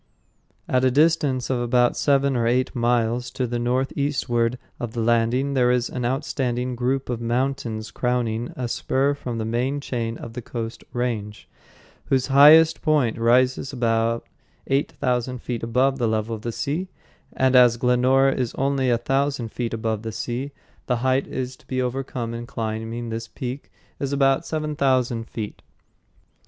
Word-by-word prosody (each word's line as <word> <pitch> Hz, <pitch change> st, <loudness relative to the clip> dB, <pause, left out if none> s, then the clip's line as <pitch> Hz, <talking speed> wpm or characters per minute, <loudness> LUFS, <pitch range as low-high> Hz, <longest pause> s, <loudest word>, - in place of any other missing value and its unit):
At 130 Hz, 0 st, +1 dB
a 130 Hz, -, +5 dB
distance 145 Hz, -2 st, +2 dB
of 125 Hz, -, 0 dB
about 120 Hz, 0 st, +2 dB
seven 140 Hz, -1 st, +2 dB
or 115 Hz, -1 st, +1 dB
eight 125 Hz, +2 st, +1 dB
miles 120 Hz, 0 st, +1 dB
to 130 Hz, -, -1 dB
the 120 Hz, 0 st, -2 dB
northeastward 125 Hz, -1 st, 0 dB, 0.2 s
of 120 Hz, -2 st, -5 dB
the 120 Hz, -, -3 dB
landing, 120 Hz, +4 st, +2 dB
there 125 Hz, -2 st, +3 dB
is 125 Hz, -1 st, +1 dB
an 125 Hz, -2 st, -3 dB
outstanding 125 Hz, -1 st, -1 dB
group 130 Hz, +2 st, -1 dB
of 120 Hz, -2 st, -3 dB
mountains 120 Hz, -2 st, -2 dB
crowning 120 Hz, -2 st, -1 dB
a 125 Hz, -1 st, -3 dB
spur 135 Hz, +4 st, 0 dB
from 125 Hz, -4 st, -5 dB
the 110 Hz, -, -2 dB
main 125 Hz, +5 st, -1 dB
chain 115 Hz, -4 st, -3 dB
of 115 Hz, -, -9 dB
the 125 Hz, -, -5 dB
Coast 115 Hz, 0 st, -6 dB
Range, 115 Hz, -5 st, -3 dB, 0.6 s
whose 130 Hz, -2 st, +1 dB
highest 155 Hz, +3 st, +7 dB
point 145 Hz, -8 st, +1 dB
rises 125 Hz, +3 st, +2 dB
about 115 Hz, -1 st, 0 dB, 0.4 s
eight 135 Hz, +2 st, 0 dB
thousand 125 Hz, 0 st, -1 dB
feet 120 Hz, -2 st, -3 dB
above 130 Hz, +4 st, +1 dB
the 120 Hz, -, +1 dB
level 110 Hz, +1 st, -1 dB
of 110 Hz, -, -10 dB
the 120 Hz, -, -3 dB
sea; 155 Hz, +10 st, -2 dB, 0.5 s
and 130 Hz, 0 st, +2 dB
as 120 Hz, -2 st, +6 dB
Glenora 130 Hz, +3 st, +3 dB
is 125 Hz, -3 st, -2 dB
only 135 Hz, -1 st, +1 dB
a 120 Hz, -, +3 dB
thousand 135 Hz, 0 st, -1 dB
feet 120 Hz, -2 st, -3 dB
above 110 Hz, -1 st, -2 dB
the 110 Hz, 0 st, -5 dB
sea, 125 Hz, +5 st, -4 dB, 0.4 s
the 125 Hz, -, +2 dB
height 130 Hz, +1 st, +1 dB
to 130 Hz, 0 st, -5 dB
be 130 Hz, -, -2 dB
overcome 125 Hz, -2 st, -3 dB
in 120 Hz, 0 st, -6 dB
climbing 115 Hz, +1 st, -4 dB
this 115 Hz, 0 st, -4 dB
peak 125 Hz, +4 st, -6 dB, 0.3 s
is 140 Hz, -1 st, -2 dB
about 135 Hz, -1 st, +2 dB
seven 155 Hz, -1 st, -2 dB
thousand 125 Hz, -5 st, +1 dB
feet. 105 Hz, -3 st, -6 dB
125 Hz, 165 wpm, -23 LUFS, 115-135 Hz, 0.6 s, highest